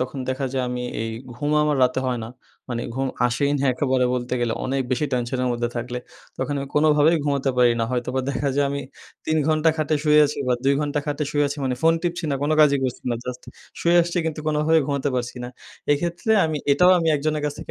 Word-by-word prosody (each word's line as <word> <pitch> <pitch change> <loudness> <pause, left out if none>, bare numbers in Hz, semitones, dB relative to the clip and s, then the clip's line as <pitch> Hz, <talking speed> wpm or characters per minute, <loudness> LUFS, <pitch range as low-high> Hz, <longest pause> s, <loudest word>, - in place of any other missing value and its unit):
তখন 130 +2 -3
দেখা 130 +1 -1
যায় 130 -1 0
আমি 125 0 -3 0.2
এই 115 - -3 0.2
ঘুম 145 +4 -2
আমার 150 -1 +1
রাতে 125 +1 +2
হয় 125 -1 -1
না। 110 - -7 0.4
মানে 120 -1 -3
ঘুম 135 +1 -1 0.2
আসেই 125 +4 0
না 140 - -1
একেবারে 130 -1 +1
বলতে 125 0 -2
গেলে, 120 -2 0
অনেক 135 +1 0
বেশি 140 +4 +1
টেনশনের 125 +1 -1
মধ্যে 120 0 -1
থাকলে, 125 +1 -3 0.4
তখন 135 +2 -2
আমি 140 0 -5
কোনোভাবেই 150 +2 +4
ঘুমোতে 140 -2 0
পারি 125 -1 +5
না। - - +2
হয়তোবা 125 +1 -1
দেখা 140 0 -1
যায় 145 - +3
আমি 140 - -2 0.5
৩ 160 - +1
ঘন্টা 155 +1 +3
খাটে 155 -1 0
শুয়ে 150 -1 +5
আছি 145 - -5
বা 125 - +3
২ 140 +1 +4
ঘন্টা 150 0 -1
খাটে 145 +1 -1
শুয়ে 145 -1 +2
আছি 145 - -5
মানে, 130 -1 0
ফোন 165 0 +5
টিপছি 175 0 -2
না - - +1
কোনো 155 +2 +2
কাজই 140 -2 +5
করছি 125 -2 -3
না। - - +1
জাস্ট 125 0 -6 0.4
শুয়ে 170 +1 +3
আসছি 175 +1 -2
কিন্তু 155 -1 -3
কোনোভাবে 155 +1 +3
ঘুমাতে 140 -1 -1
পারছি 125 0 -3
না। - - -5 0.4
এক্ষেত্রে 170 +8 -2
আমি 155 -1 -1 0.2
এটাও 180 +5 +5
আমি 165 -1 0
একজনের 155 +1 -1
কাছ 145 - -1
থেকে - - -8
140 Hz, 225 wpm, -23 LUFS, 125-150 Hz, 0.5 s, পারি